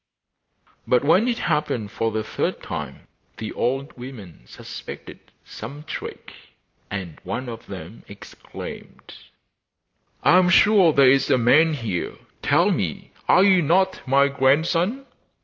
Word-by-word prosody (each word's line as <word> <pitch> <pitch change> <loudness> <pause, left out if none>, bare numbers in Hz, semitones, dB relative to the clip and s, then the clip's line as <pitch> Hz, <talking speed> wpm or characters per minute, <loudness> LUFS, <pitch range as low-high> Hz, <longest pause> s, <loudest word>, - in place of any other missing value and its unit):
But 125 +1 +3
when 185 +10 +4
it 240 -2 0
happened 150 -9 -1
for 115 0 -1
the 110 0 -3
third - - -3
time - - -7 0.3
the 110 - -6
old 135 +3 -2
women 105 - -11
suspected - - -10 0.3
some 140 +7 -9
trick, 160 - -8 0.6
and 95 -5 -6
one 130 +1 -4
of 115 -1 -8
them 95 +2 -9
exclaimed: 100 0 -11 1.1
'I 180 - +6
am 180 -1 +3
sure 195 -1 +5
there 135 -3 +5
is 135 0 +2
a - - +4
man 150 +7 +4
here; 110 -9 -4 0.3
tell - - +3
me, - - -3 0.2
are 185 - +6
you 190 -2 +5
not 185 +5 +1
my 140 +2 +4
grandson? 165 - +1
135 Hz, 130 wpm, -23 LUFS, 115-165 Hz, 1.1 s, I